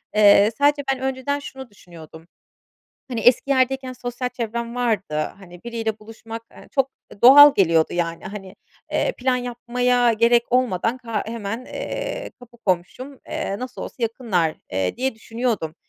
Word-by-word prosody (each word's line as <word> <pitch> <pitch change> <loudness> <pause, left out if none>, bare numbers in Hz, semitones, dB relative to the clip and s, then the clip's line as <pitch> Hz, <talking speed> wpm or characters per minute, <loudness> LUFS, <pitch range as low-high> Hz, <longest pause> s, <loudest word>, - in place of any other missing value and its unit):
Eee, 205 0 +6
sadece 285 0 +3
ben 265 - -7
önceden 265 +2 -2
şunu 265 -2 -9
düşünüyordum. 165 -4 -14 0.8
Hani, 240 -3 -3
eski 245 +3 +4
yerdeyken 265 -1 +1
sosyal 245 0 -4
çevrem 235 -1 -4
vardı. 225 -10 -1 0.2
Hani, 175 -2 -14
biriyle 225 -2 -3
buluşmak, 225 +1 -9
eee, - - -15
çok, 270 -1 +1 0.2
eee, 200 - -15
doğal 285 +3 +10
geliyordu, 165 -4 +3
yani. 170 -1 -2
Hani, 195 -1 -8 0.4
eee, - - +1
plan 255 0 +1
yapmaya 245 0 +1
gerek 235 +2 +4
olmadan 240 -2 +1
ka 230 -4 -3
hemen, 225 +2 -5
eee, - - -5
kapı 240 -1 -16
komşum, 230 +7 -3
eee, 195 - -3
nasıl 255 0 -7
olsa - - -7
yakınlar, 220 -9 0 0.2
eee, 95 0 -1
diye 260 0 -1
düşünüyordum. 225 -8 -3
235 Hz, 145 wpm, -22 LUFS, 205-255 Hz, 0.8 s, doğal